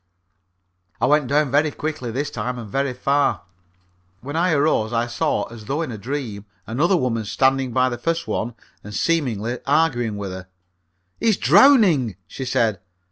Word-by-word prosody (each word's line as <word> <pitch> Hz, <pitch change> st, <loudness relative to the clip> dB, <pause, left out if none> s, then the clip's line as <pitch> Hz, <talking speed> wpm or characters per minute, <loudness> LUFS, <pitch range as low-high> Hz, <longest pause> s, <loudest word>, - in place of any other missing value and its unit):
I -, -, +2 dB
went 150 Hz, -1 st, +3 dB
down 145 Hz, 0 st, +1 dB
very 150 Hz, +2 st, +3 dB
quickly 150 Hz, -4 st, -4 dB
this 140 Hz, +5 st, -3 dB
time 125 Hz, -3 st, -3 dB
and 115 Hz, -2 st, -7 dB
very 135 Hz, +5 st, -1 dB
far. 140 Hz, +3 st, +1 dB, 0.8 s
When 145 Hz, +4 st, -6 dB
I 175 Hz, +2 st, +2 dB
arose 140 Hz, -7 st, +2 dB
I 115 Hz, 0 st, +1 dB
saw 120 Hz, -3 st, -1 dB
as 110 Hz, -2 st, -11 dB
though 140 Hz, +7 st, -1 dB
in 150 Hz, -, -5 dB
a 110 Hz, -, -6 dB
dream 115 Hz, -4 st, -5 dB, 0.2 s
another 155 Hz, -, +1 dB
woman 120 Hz, -6 st, -1 dB
standing 130 Hz, +4 st, +1 dB
by 130 Hz, +2 st, +2 dB
the 120 Hz, -2 st, -5 dB
first 165 Hz, +5 st, -1 dB
one 120 Hz, +1 st, -2 dB, 0.3 s
and 105 Hz, 0 st, -8 dB
seemingly 125 Hz, -8 st, 0 dB
arguing 135 Hz, -8 st, +1 dB
with 100 Hz, -2 st, -5 dB
her. 95 Hz, 0 st, -8 dB, 0.7 s
"He's 220 Hz, -4 st, +2 dB
drowning!" 185 Hz, -, +5 dB
she 130 Hz, +9 st, -7 dB
said. 110 Hz, -5 st, +1 dB
130 Hz, 165 wpm, -22 LUFS, 115-150 Hz, 0.8 s, drowning